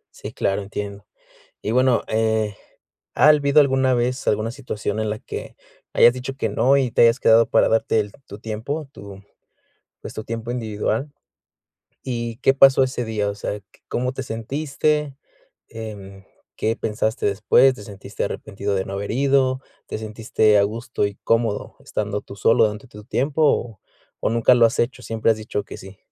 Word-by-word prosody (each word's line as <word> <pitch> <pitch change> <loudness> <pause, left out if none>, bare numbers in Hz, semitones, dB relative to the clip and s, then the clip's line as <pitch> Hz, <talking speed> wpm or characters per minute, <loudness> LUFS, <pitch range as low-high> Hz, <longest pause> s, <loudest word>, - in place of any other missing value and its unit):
Sí, - - -8
claro, 95 +1 -1
entiendo. 100 0 -6 0.6
Y 105 - -2
bueno, 130 0 +3
eh, 110 -1 0 0.6
¿ha - - +5
habido 150 -1 +5
alguna 135 -2 +3
vez 125 +2 -1
alguna 110 +2 +1
situación 110 -5 -4
en 110 - -1
la 105 0 -3
que, - - -8 0.4
hayas 120 - +6
dicho 130 +1 -6
que 110 - -1
no 125 +7 +3
y 130 -3 0
te - - +2
hayas 115 +2 +4
quedado 115 +1 +5
para - - +3
darte 110 0 +2
el 105 -1 -2
tu 100 - -10
tiempo, 120 +8 -4
tu 100 -1 -11 0.8
pues - - -8
tu 110 - -6
tiempo 115 +1 -4
individual? 115 +3 -2 0.9
Y, 120 -3 -3
¿qué 135 0 +3
pasó 135 -1 +6
ese 130 -1 -3
día? 105 -2 -1
O 100 - -3
sea, 105 0 -5 0.3
¿cómo 125 +1 -1
te 135 - -5
sentiste? 140 +4 -2 0.5
Em, 100 -3 -9 0.3
¿Qué 110 +1 0
pensaste 110 +1 -1
después? 110 +6 +4
¿Te 105 - -11
sentiste 100 0 -6
arrepentido 100 -1 -4
de 95 - -1
no - - -7
haber 100 +1 -4
ido? 130 0 +2 0.3
¿Te - - -5
sentiste 110 -1 +1
a 100 - +5
gusto 115 +1 -2
y 100 - -6
cómodo 115 -2 0
estando 105 -1 -3
tú 100 - -11
solo 115 +3 +4
durante 105 +3 -3
tu 105 -2 -13
tiempo? 140 +7 -1
O 120 -8 +1 0.4
o, - - +2
nunca 115 +2 +4
lo 120 -1 +6
has 115 - -3
hecho, 125 +1 -1
siempre 115 -1 0
has 110 - +1
dicho 105 -2 -4
que - - -9
sí. 95 0 -12
115 Hz, 175 wpm, -22 LUFS, 105-130 Hz, 0.9 s, hayas